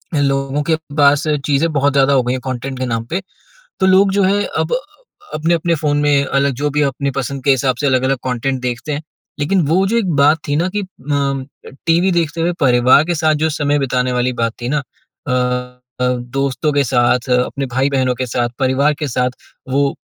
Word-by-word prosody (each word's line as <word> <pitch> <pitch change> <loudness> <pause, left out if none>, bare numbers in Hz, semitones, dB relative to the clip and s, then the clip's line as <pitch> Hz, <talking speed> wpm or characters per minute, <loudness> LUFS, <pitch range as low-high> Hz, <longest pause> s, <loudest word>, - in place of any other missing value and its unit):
लोगों 135 0 0
के 160 +1 +1 0.2
पास 145 0 +4 0.2
चीज़ें 150 +3 +1
बहुत 140 -1 +2
ज़्यादा 140 0 +3
हो 130 -2 +3
गई 125 +1 -1
हैं 130 - -3
कंटेंट 130 +1 -4
के 130 - -1
नाम 115 -2 -2
पे। 180 +4 -1 0.6
तो 190 - +3
लोग 190 +1 +5
जो 200 - +2
है 200 +2 +2 0.2
अब - - -1
अ, - - +1 0.6
अपने-अपने 165 +1 +1
फ़ोन 150 -2 0
में 145 -1 +3
अलग 140 0 +1
जो 150 - +1
भी 150 +1 0
अपनी 140 0 -1
पसंद 135 0 -4
के 140 - +3
हिसाब 130 -1 +2
से 145 - 0
अलग-अलग 130 0 +2
कंटेंट 130 +1 -2
देखते 125 +4 -3
हैं। 145 +1 -3 0.4
लेकिन 175 +5 +2
वो 185 +4 +3
जो 225 +4 0
एक 200 -6 -1
बात 145 +3 +4
थी 145 - +1
ना 175 +4 +1
कि - - +1
अ, 140 -5 -4 0.2
टीवी 170 +3 +3
देखते 165 -1 -1
हुए 170 +2 +1
परिवार 130 +1 +5
के 175 +1 -1
साथ 155 -1 +2
जो - - +3
समय 145 -1 0
बिताने 125 -2 0
वाली 125 +1 0
बात 115 -1 0
थी 120 - -2
ना, 150 - +1
अ, 125 -2 -4 0.3
दोस्तों 125 +4 -1
के 145 0 +2
साथ 125 0 +1
अपने 125 +2 0
भाई-बहनों 130 0 0
के 130 +1 -3
साथ 120 0 -1
परिवार 135 +2 +2
के 150 - -2
साथ 125 0 0 0.4
वो 140 +1 +1
140 Hz, 205 wpm, -17 LUFS, 130-150 Hz, 0.6 s, लोग